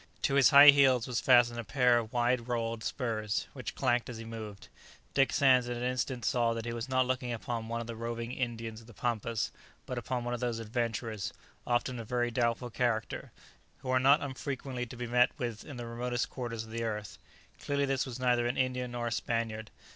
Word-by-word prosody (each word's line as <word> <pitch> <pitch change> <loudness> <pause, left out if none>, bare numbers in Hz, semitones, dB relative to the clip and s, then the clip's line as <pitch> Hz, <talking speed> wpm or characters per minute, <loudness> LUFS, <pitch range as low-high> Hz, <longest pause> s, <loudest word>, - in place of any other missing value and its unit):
To - - +2
his 140 -2 +6
high 145 +1 +11
heels 135 -4 +4
was 125 -2 -2
fastened 120 -2 +5
a - - -3
pair 125 0 +3
of 110 -1 -6
wide 120 0 +1
rowelled 115 -2 -2
spurs, 110 -5 -2
which - - -6
clanked 120 0 +1
as 120 - -6
he 115 - -8
moved. 110 -3 -8 0.5
Dick 135 -1 +3
Sands 130 -3 +4
in 120 - -3
an 120 - -4
instant 125 -1 -2
saw 120 -2 +2
that 115 0 -5
he 120 - -3
was 120 +2 -5
not 130 0 +3
looking 125 -1 -2
upon 115 -1 -4
one 115 +1 -3
of - - -5
the 115 0 -6
roving 115 +1 -4
Indians 115 -3 -4
of 115 - -17
the 115 - -14
pampas, 115 -1 -1 0.3
but 125 - -3
upon 120 +1 -3
one 120 0 -2
of 120 - -3
those 120 -2 -1
adventurers, 115 -2 -3 0.3
often 120 0 0
of 115 - -8
very 120 -1 0
doubtful 120 +1 0
character, 115 -2 -1 0.5
who 130 - -2
are 130 - +4
not 140 +3 +5
unfrequently 130 -2 -4
to 120 - -10
be 120 - -4
met 125 +1 +4
with 120 -3 -4
in 145 -4 -9
the 120 - -5
remotest 120 +1 -2
quarters 115 -3 -4
of 110 - -12
the 115 +1 -3
earth. 105 -3 -4 0.4
Clearly 140 0 +1
this 135 -1 0
was 130 -2 -6
neither 125 -1 +2
an 120 - -2
Indian 125 -1 -1
nor 120 -1 -3
a 120 - -2
Spaniard. 115 -2 -2
120 Hz, 215 wpm, -31 LUFS, 115-125 Hz, 0.5 s, high